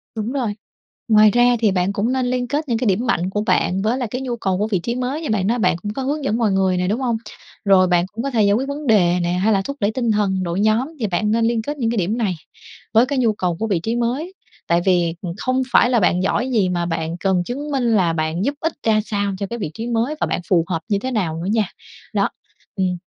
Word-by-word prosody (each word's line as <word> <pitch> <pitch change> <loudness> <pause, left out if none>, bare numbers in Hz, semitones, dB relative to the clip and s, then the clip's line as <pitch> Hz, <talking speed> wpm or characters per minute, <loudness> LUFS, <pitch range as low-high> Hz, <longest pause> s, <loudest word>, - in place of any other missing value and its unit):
Đúng 220 +2 -3
rồi. 245 -7 -2 0.5
Ngoài 215 -2 +6
ra 245 +2 +4
thì 220 -3 +3
bạn 185 +1 0
cũng 210 +5 0
nên 260 -1 0
liên 250 0 -1
kết 290 +3 -2
những 230 - +1
cái 240 - -1
điểm 205 +5 +1
mạnh 185 -6 +1
của 210 +2 -1
bạn 190 -3 +1
với 220 +5 +1
lại 250 -3 -2
cái 250 +5 -4
nhu 250 -2 -3
cầu 190 -5 -1
của 210 +3 0
vị 200 -5 0
trí 235 +7 -3
mới, 255 +5 -2
như 315 - -4
bạn 195 -3 +1
nói 240 +3 +1
bạn 180 -4 +2
cũng 205 +4 -5
có 265 - -4
hướng 290 +3 -2
dẫn 230 -4 0
mọi 225 -4 +2
người 190 -1 +2
nè, 180 0 0
đúng 215 +6 0
hông? 240 -3 0 0.5
Rồi 190 -2 +5
bạn 175 -1 +2
cũng 225 +2 -4
có 275 - -2
thể 225 -4 +2
giải 200 0 +4
quyết 255 +6 0
vấn 285 +1 -5
đề 180 -5 +4
nè, 175 0 0
hay 195 +5 +2
là 195 - +2
thúc 280 +8 -6
đẩy 205 -1 +1
tinh 235 0 0
thần 195 -3 +1
đội 175 +1 -2
nhóm. 220 +5 +2
Thì 220 - 0
bạn 205 +3 0
nên 225 +1 +2
liên 230 -1 +1
kết 290 +6 -5
những 235 -5 0
cái 235 - -2
điểm 200 +4 0
này 205 -7 0 0.6
với 230 +2 +6
cái 275 0 -1
nhu 230 -3 +2
cầu 180 -4 -1
của 225 - -1
vị 195 -5 +1
trí 225 +7 -2
mới. 255 +10 -2 0.3
Tại 170 0 +2
vì, 175 -3 +2
ừm, 175 -3 -4
không 255 +2 0
phải 240 - +5
là 245 -2 +3
bạn 180 -1 +2
giỏi 250 +6 0
gì 210 -6 +2
mà 175 -1 -1
bạn 165 0 -3
cần 190 -2 +1
chứng 280 +9 -5
minh 270 -3 0
là 175 -5 +2
bạn 160 +4 -1
giúp 280 - 0
ích 325 +1 -1
ra 215 -1 +4
sao 200 -2 -1
cho 200 - -1
cái 235 - -5
vị 160 - -3
trí 225 +1 -5
mới 240 +5 0
và - - 0
bạn - - -2
phù 175 -4 +4
hợp 170 -3 -2
như 200 -2 +1
thế 260 +5 -4
nào 180 -9 -1
nữa 185 - -2
nha. 220 -2 +2 0.5
Đó, - - +2 0.5
ừm, 185 -3 0
215 Hz, 285 wpm, -20 LUFS, 185-245 Hz, 0.6 s, Ngoài